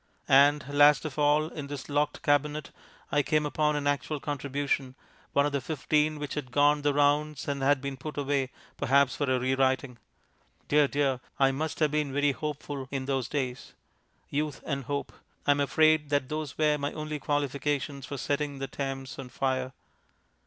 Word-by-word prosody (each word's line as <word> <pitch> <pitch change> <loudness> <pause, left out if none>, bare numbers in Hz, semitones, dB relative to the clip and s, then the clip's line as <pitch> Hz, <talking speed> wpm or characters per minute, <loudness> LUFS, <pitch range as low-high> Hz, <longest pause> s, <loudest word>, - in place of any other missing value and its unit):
And 140 +1 +5
last 145 +1 +5
of 155 -1 -5
all, 150 +1 +3
in 150 -4 -7
this 140 -2 -6
locked 145 +2 -1
cabinet 150 0 +1 0.4
I 145 - +3
came 150 +1 +1
upon 150 0 +1
an 145 -1 -2
actual 145 +1 0
contribution, 140 -2 -2 0.4
one 140 - +3
of 145 - 0
the 140 -1 -1
fifteen 155 +1 0
which 150 -1 -5
had 145 -4 -4
gone 145 +2 +4
the 145 0 +2
rounds 145 +1 +1
and 140 -1 -2
had 140 0 +3
been 140 -1 -4
put 150 +3 -7
away, 140 -2 0 0.3
perhaps 140 0 +3
for 145 -2 -1
a 130 - +2
re 130 +1 0
writing.... 130 -2 0 0.7
Dear, 150 0 +4
dear! 140 -2 0 0.2
I 135 -1 +4
must 155 +3 -3
have 150 -2 +3
been 150 -2 0
very 145 +1 +2
hopeful 145 -2 -5
in 135 -2 -3
those 135 -3 -1
days. 130 -3 -4 0.5
Youth 150 -1 -3
and 140 -3 -3
hope 140 +2 -3 0.3
I - - +5
am 145 - +2
afraid 155 +1 +3
that 145 -2 0
those 155 -2 -4
were 150 -1 +2
my 140 +1 -2
only 155 -1 -4
qualifications 145 -1 -2
for 140 - -5
setting 145 +1 -2
the 135 - -3
Thames 135 -1 -5
on 125 - -7
fire. 130 0 -1
145 Hz, 180 wpm, -28 LUFS, 135-150 Hz, 0.7 s, And